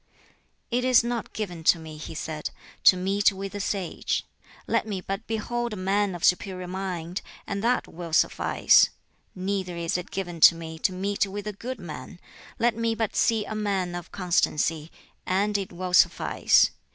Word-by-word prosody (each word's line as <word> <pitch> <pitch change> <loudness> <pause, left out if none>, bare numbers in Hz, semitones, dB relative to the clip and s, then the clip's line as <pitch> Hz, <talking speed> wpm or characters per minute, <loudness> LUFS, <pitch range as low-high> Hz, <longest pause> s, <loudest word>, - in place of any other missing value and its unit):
"It 245 +1 +1
is 255 -2 +5
not 235 -1 -3
given 180 -6 -5
to 170 - +6
me," 160 -1 -9
he 155 +1 -8
said, 155 -1 -4 0.4
"to 185 - +8
meet 195 +3 +2
with 195 0 -6
a 205 - -4
sage; 195 -3 -2 0.4
let - - 0
me 200 -3 -3
but 195 +4 -5
behold 240 +1 -2
a - - -3
man 195 0 0
of 175 - -8
superior 185 0 +1
mind, 180 -1 -4 0.2
and 200 0 -3
that 245 +2 +1
will 170 -1 -8
suffice. 155 - +4 0.5
Neither 185 -2 -2
is 170 +1 -1
it 180 - -8
given 175 -3 -4
to 165 - +9
me 160 -1 -8
to 190 - +1
meet 200 +2 -1
with 205 +1 -6
a 210 - -3
good 250 +6 -6
man; 175 +1 -8 0.4
let 235 0 +2
me 230 0 0
but 225 -2 -2
see 225 -3 +2
a - - -5
man 200 -4 -1
of 175 -1 -7
constancy, 165 -3 0 0.4
and 200 +3 +1
it 195 -2 -1
will 180 0 -5
suffice. - - +4
190 Hz, 175 wpm, -26 LUFS, 175-210 Hz, 0.5 s, to